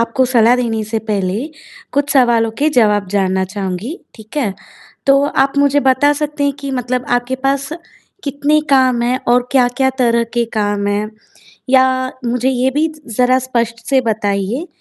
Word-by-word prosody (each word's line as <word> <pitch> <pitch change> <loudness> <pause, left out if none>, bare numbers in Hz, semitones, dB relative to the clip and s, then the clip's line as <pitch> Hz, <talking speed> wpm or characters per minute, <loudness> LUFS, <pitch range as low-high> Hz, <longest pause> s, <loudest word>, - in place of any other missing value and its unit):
आपको 230 +3 +1
सलाह 240 -1 +4
देने 230 -3 -1
से 220 +1 -2
पहले 200 +4 -1 0.5
कुछ 285 +1 0
सवालों 235 -4 +3
के 295 +2 +3
जवाब 210 -4 +3
जानना 190 -1 0
चाहूँगी, 195 - -5 0.2
ठीक 220 +3 -14
है। 240 -9 0 0.5
तो 275 0 +5
आप 275 -1 +1
मुझे 285 0 +3
बता 270 +2 +3
सकते 295 0 -2
हैं 285 - +1
कि 280 -1 -4
मतलब 250 -1 -2
आपके 245 +1 0
पास 275 0 0 0.6
कितने 290 +2 +1
काम 260 -3 +3
हैं 250 +2 0
और 245 +1 +2
क्या-क्या 260 0 +2
तरह 235 -2 +2
के 240 -1 +2
काम 205 -1 0
हैं? 205 +1 -1 0.6
या 260 0 +6 0.4
मुझे 250 +2 0
ये 260 0 +1
भी 300 +4 +1 0.3
ज़रा 250 0 +4
स्पष्ट 235 -3 -2
से 270 - +4
बताइए 215 - -2
245 Hz, 160 wpm, -16 LUFS, 220-270 Hz, 0.6 s, या